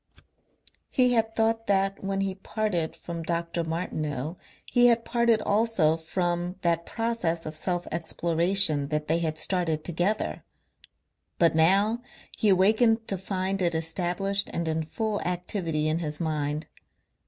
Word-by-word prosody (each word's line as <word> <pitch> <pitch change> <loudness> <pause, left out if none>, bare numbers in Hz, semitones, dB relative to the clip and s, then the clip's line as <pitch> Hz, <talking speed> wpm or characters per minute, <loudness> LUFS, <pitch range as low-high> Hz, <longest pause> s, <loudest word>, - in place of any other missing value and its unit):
He 250 -1 +3
had 225 -1 +1
thought 225 0 +1
that 195 0 +1
when 195 0 -1
he 195 -1 -1
parted 190 -4 -2
from 170 0 -6
Dr. 170 0 -2
Martineau 155 -3 -3 0.3
he 245 0 +4
had 235 -1 +3
parted 235 -2 +2
also 205 -7 +2
from 175 +2 -2
that 170 -1 +1
process 225 -8 -1
of 155 - -5
self 175 +2 -2
exploration 165 -1 +2
that 150 +1 -2
they 165 +2 +2
had 160 -2 -2
started 165 -3 0
together, 180 +5 -1 0.9
but 170 -2 +4
now 195 +8 +3 0.3
he 215 - +2
awakened 220 +4 +4
to 195 - +1
find 190 0 -2
it 170 -2 +1
established 180 +4 -1
and 170 -1 -2
in 160 0 0
full 215 +6 -2
activity 175 -3 -2
in 155 +1 0
his 150 -3 -3
mind. 150 -1 -2
175 Hz, 140 wpm, -27 LUFS, 160-205 Hz, 0.9 s, he